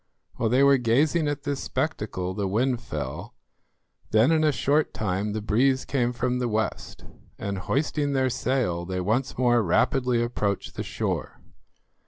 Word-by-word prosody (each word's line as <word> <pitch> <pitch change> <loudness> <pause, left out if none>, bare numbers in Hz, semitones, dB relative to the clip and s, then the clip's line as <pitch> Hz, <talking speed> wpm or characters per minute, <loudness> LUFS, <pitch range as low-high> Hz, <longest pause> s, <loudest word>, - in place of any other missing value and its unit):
While 115 - 0
they 130 +4 +4
were 140 -1 +5
gazing 145 +7 +2
at 145 -1 -3
this 140 -1 -2
spectacle 105 - -2
the 100 0 -2
wind 120 +5 0
fell; - - -6 0.7
then 110 +7 +4
in 160 -1 +3
a 155 - +4
short 145 +2 +1
time 105 0 -1
the 110 -1 -3
breeze 130 +5 +2
came 125 -3 0
from 125 +1 -1
the 125 - 0
west, 110 -1 -3 0.3
and 100 -1 -4
hoisting 145 - -1
their 130 -1 +1
sail 120 -9 -1
they 90 +1 -3
once 110 +8 -1
more 120 -1 +3
rapidly 120 +6 +2
approached 105 -4 -2
the - - -5
shore. - - -3
125 Hz, 160 wpm, -25 LUFS, 105-135 Hz, 0.7 s, were